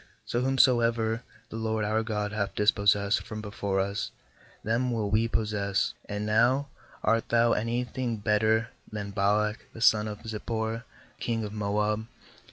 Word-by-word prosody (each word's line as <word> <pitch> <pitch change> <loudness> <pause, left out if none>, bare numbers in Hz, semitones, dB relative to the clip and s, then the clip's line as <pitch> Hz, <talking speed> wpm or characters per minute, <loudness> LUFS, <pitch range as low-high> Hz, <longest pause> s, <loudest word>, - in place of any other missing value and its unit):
So 120 - -1
whomsoever 120 -3 +3 0.3
the 110 - -6
LORD 110 -1 -1
our 110 +1 +1
God 105 -2 -2
hath 100 -2 -2
dispossessed 100 0 +3
from 110 - -7
before 100 -2 -2
us, 100 +2 -1 0.5
them 115 +4 +1
will 110 -3 -1
we 110 +2 +3
possess. 105 -3 0 0.2
25And 105 0 -3
now 120 +6 +3 0.3
art 115 0 +2
thou 115 0 +4
any 115 +3 0
thing 125 -1 -3
better 110 +2 +2 0.2
than 100 -1 -4
Balak 105 +2 0
the - - -9
son 110 -2 +5
of 105 -1 -7
Zippor, 110 +1 -3 0.3
king 115 -2 -1
of 105 -1 -5
Moab? 105 +1 0
110 Hz, 150 wpm, -28 LUFS, 105-115 Hz, 0.5 s, son